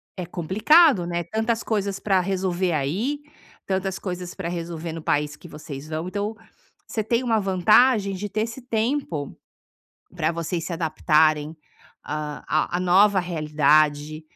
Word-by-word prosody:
é 180 Hz, -, -5 dB
complicado, 195 Hz, -, +4 dB
né, 175 Hz, 0 st, -2 dB
tantas 220 Hz, +6 st, -1 dB
coisas 200 Hz, -3 st, -1 dB
para 195 Hz, -3 st, +2 dB
resolver 185 Hz, -1 st, -1 dB
aí, 195 Hz, -, -1 dB, 0.4 s
tantas 190 Hz, 0 st, -2 dB
coisas 180 Hz, -1 st, -6 dB
para 185 Hz, -3 st, -4 dB
resolver 170 Hz, -1 st, -5 dB
no 165 Hz, -, -6 dB
país 150 Hz, 0 st, 0 dB
que -, -, -14 dB
vocês 150 Hz, -1 st, -9 dB
vão, 160 Hz, +2 st, -3 dB
então 205 Hz, +3 st, -3 dB, 0.5 s
você 220 Hz, -, -2 dB
tem 235 Hz, +3 st, 0 dB
uma 230 Hz, -3 st, +2 dB
vantagem 200 Hz, +3 st, +4 dB
de 205 Hz, +2 st, -5 dB
ter 215 Hz, +2 st, -1 dB
esse 230 Hz, +3 st, -4 dB
tempo 225 Hz, -, -2 dB, 0.8 s
para 165 Hz, -3 st, 0 dB
vocês 170 Hz, 0 st, -3 dB
se -, -, -5 dB
adaptarem, 155 Hz, -1 st, +2 dB, 0.5 s
ah, 150 Hz, 0 st, -5 dB
a 155 Hz, +3 st, 0 dB
a -, -, -2 dB
nova 190 Hz, +3 st, +4 dB
realidade, 155 Hz, -2 st, +1 dB
180 Hz, 145 wpm, -24 LUFS, 155-205 Hz, 0.8 s, complicado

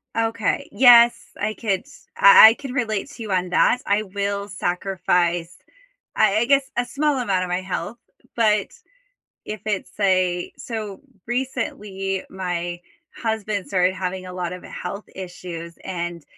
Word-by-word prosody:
Okay, 225 Hz, -1 st, -1 dB
yes, 235 Hz, +1 st, +6 dB
I 215 Hz, +1 st, -1 dB
could 205 Hz, 0 st, -2 dB, 0.3 s
I 485 Hz, -, +10 dB
I -, -, +2 dB
could 270 Hz, +1 st, -8 dB
relate 230 Hz, -2 st, -2 dB
to 230 Hz, -, -9 dB
you 210 Hz, -, -6 dB
on 180 Hz, -1 st, 0 dB
that. 235 Hz, +7 st, +3 dB
I 205 Hz, +2 st, +2 dB
will 200 Hz, 0 st, -3 dB
sacrifice, 180 Hz, -3 st, -1 dB, 0.6 s
I 205 Hz, -1 st, +4 dB
I 225 Hz, -, +2 dB
guess, 275 Hz, 0 st, +2 dB
a 245 Hz, -, +1 dB
small 290 Hz, +1 st, 0 dB
amount 195 Hz, -7 st, 0 dB
of 180 Hz, -, -6 dB
my 180 Hz, +1 st, 0 dB
health, 200 Hz, +5 st, -5 dB, 0.4 s
but 215 Hz, -3 st, +2 dB, 0.8 s
if 215 Hz, -2 st, -6 dB
it's 205 Hz, -3 st, -2 dB
a 185 Hz, -2 st, +1 dB
So, 215 Hz, -5 st, -6 dB, 0.3 s
recently, 210 Hz, -6 st, -3 dB
my 175 Hz, -2 st, -4 dB, 0.4 s
husband 215 Hz, -3 st, -2 dB
started 185 Hz, -1 st, +1 dB
having 185 Hz, 0 st, -4 dB
a 180 Hz, -, -8 dB
lot 180 Hz, -1 st, -4 dB
of 180 Hz, -, -8 dB
health 200 Hz, +1 st, -6 dB
issues 175 Hz, -2 st, -8 dB
and 175 Hz, -2 st, -4 dB
200 Hz, 145 wpm, -22 LUFS, 180-225 Hz, 0.8 s, I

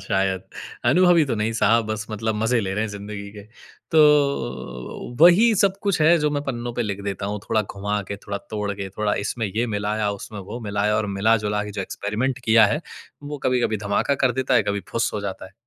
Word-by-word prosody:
शायद 95 Hz, -1 st, 0 dB, 0.5 s
अनुभवी 175 Hz, -3 st, +5 dB
तो 130 Hz, -, -1 dB
नहीं 110 Hz, +1 st, -1 dB
साहब 115 Hz, 0 st, +3 dB
बस 110 Hz, 0 st, -3 dB
मतलब 110 Hz, +1 st, -2 dB
मज़े 115 Hz, +1 st, +2 dB
ले 95 Hz, -2 st, -3 dB
रहे 105 Hz, -, 0 dB
हैं -, -, -3 dB
ज़िंदगी 100 Hz, 0 st, -7 dB
के। 105 Hz, -1 st, -10 dB, 0.5 s
तो 140 Hz, -, +1 dB
वही 190 Hz, +8 st, +7 dB
सब 195 Hz, -1 st, +2 dB
कुछ 200 Hz, -5 st, 0 dB
है 165 Hz, +3 st, +6 dB
जो 150 Hz, -1 st, +1 dB
मैं 145 Hz, -1 st, -2 dB
पन्नों 120 Hz, -3 st, -4 dB
पे 120 Hz, -, -1 dB
लिख 100 Hz, -3 st, -4 dB
देता 100 Hz, 0 st, -3 dB
हूँ 105 Hz, +1 st, -3 dB
थोड़ा 110 Hz, -, +2 dB
घुमा 105 Hz, +1 st, -3 dB
के 100 Hz, -, -4 dB
थोड़ा 100 Hz, 0 st, -5 dB
तोड़ 105 Hz, -2 st, -2 dB
के 100 Hz, -1 st, -5 dB
थोड़ा 105 Hz, +2 st, -1 dB
इसमें 115 Hz, +1 st, -2 dB
ये 110 Hz, +5 st, -1 dB
मिलाया 105 Hz, -1 st, -1 dB
उसमें 100 Hz, +1 st, -8 dB
वो 105 Hz, +5 st, -7 dB
मिलाया 105 Hz, +1 st, +1 dB
और 110 Hz, -1 st, 0 dB
मिला 110 Hz, +3 st, +4 dB
जुला 105 Hz, 0 st, 0 dB
के 105 Hz, -, -6 dB
जो 100 Hz, -1 st, -5 dB
एक्सपेरिमेंट 110 Hz, +8 st, -2 dB
किया 110 Hz, -1 st, +6 dB
है 150 Hz, -, -3 dB, 0.4 s
वो 145 Hz, 0 st, -6 dB
कभी-कभी 125 Hz, -3 st, +1 dB
धमाका 100 Hz, +7 st, +1 dB
कर 125 Hz, -, +3 dB
देता 130 Hz, 0 st, +1 dB
है 115 Hz, -, +5 dB
कभी 100 Hz, 0 st, -2 dB
फुस्स 115 Hz, -, -1 dB
हो 105 Hz, -, -2 dB
जाता 100 Hz, -2 st, -5 dB
है। 95 Hz, -, -13 dB
110 Hz, 220 wpm, -23 LUFS, 100-125 Hz, 0.5 s, वही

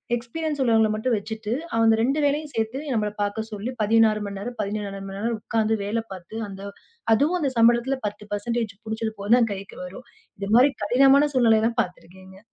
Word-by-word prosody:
Experience 290 Hz, +6 st, -4 dB
உள்ளவங்கள 225 Hz, -3 st, +3 dB
மட்டும் 230 Hz, +2 st, 0 dB
வச்சிட்டு 220 Hz, +1 st, -5 dB, 0.3 s
அந்த 225 Hz, -1 st, +4 dB
2 270 Hz, +6 st, +1 dB
வேலையும் 295 Hz, +1 st, 0 dB
சேர்த்து 225 Hz, +3 st, -2 dB
நம்மள 210 Hz, -2 st, 0 dB
பாக்கச்சொல்லி 215 Hz, +2 st, -3 dB
16 215 Hz, 0 st, +3 dB
மணி 200 Hz, -1 st, -6 dB
நேரம், 240 Hz, +5 st, -6 dB
17 205 Hz, 0 st, -3 dB, 0.2 s
மணி 195 Hz, 0 st, -7 dB
நேரம் 230 Hz, +2 st, -1 dB
உட்கார்ந்து 220 Hz, 0 st, 0 dB
வேலை 220 Hz, +3 st, -2 dB
பாத்து 185 Hz, +3 st, -11 dB
அந்த 195 Hz, 0 st, -9 dB, 0.5 s
அதுவும் 300 Hz, +10 st, +2 dB
அந்த 280 Hz, -5 st, 0 dB
சம்பளத்துல 240 Hz, +3 st, +4 dB
10% 210 Hz, +2 st, -3 dB
புடிச்சது 220 Hz, 0 st, -3 dB
போகத்தான் 225 Hz, +3 st, +3 dB
கைக்கு 195 Hz, 0 st, -9 dB
வரும். 195 Hz, +7 st, -11 dB, 0.3 s
இது 200 Hz, 0 st, -4 dB
மாரி 260 Hz, +4 st, +6 dB
கடினமான 270 Hz, +6 st, +5 dB
சூழ்நிலை 225 Hz, -3 st, +5 dB
எல்லாம் 230 Hz, +1 st, 0 dB
பாத்திருக்கேங்க. 190 Hz, 0 st, -10 dB
225 Hz, 165 wpm, -24 LUFS, 205-240 Hz, 0.5 s, மாரி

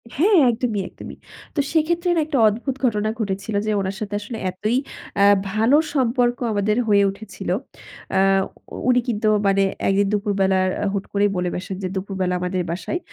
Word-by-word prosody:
হ্যাঁ 380 Hz, +8 st, +4 dB
একদমই, 225 Hz, -3 st, -1 dB
একদমই -, -, -10 dB, 0.4 s
তো 295 Hz, -, 0 dB
সেক্ষেত্রে 340 Hz, +2 st, +1 dB
না -, -, +2 dB
একটা 300 Hz, -2 st, -1 dB
অদ্ভুত 240 Hz, +5 st, -1 dB
ঘটনা 215 Hz, -2 st, +1 dB
ঘটেছিল, 200 Hz, 0 st, -3 dB
যে 215 Hz, -, 0 dB
উনার 190 Hz, +1 st, -3 dB
সাথে 205 Hz, -1 st, -5 dB
আসলে 225 Hz, +2 st, -6 dB
এতই 215 Hz, +6 st, -1 dB, 0.4 s
আ -, -, +6 dB, 0.3 s
ভালো 225 Hz, +7 st, +4 dB, 0.2 s
সম্পর্ক 245 Hz, -2 st, +1 dB, 0.2 s
আমাদের 205 Hz, +2 st, +1 dB
হয়ে 200 Hz, -1 st, +5 dB
উঠেছিল। 215 Hz, +3 st, -8 dB, 0.7 s
আ -, -, +4 dB, 0.7 s
উনি 250 Hz, 0 st, +5 dB
কিন্তু 215 Hz, -2 st, 0 dB, 0.2 s
মানে 195 Hz, 0 st, +3 dB, 0.2 s
১ 195 Hz, -, +3 dB
দিন 200 Hz, -, +3 dB
দুপুর 205 Hz, 0 st, 0 dB
বেলা 190 Hz, 0 st, +3 dB, 0.4 s
হুট 195 Hz, -, -2 dB
করেই 205 Hz, 0 st, +3 dB
বলে 180 Hz, 0 st, -1 dB
বেসেন 185 Hz, +1 st, -5 dB
যে 185 Hz, -, 0 dB
"দুপুরবেলা 190 Hz, -1 st, -2 dB
আমাদের 180 Hz, +1 st, -1 dB
বাসায় 180 Hz, -, -3 dB
210 Hz, 170 wpm, -22 LUFS, 195-245 Hz, 0.7 s, আ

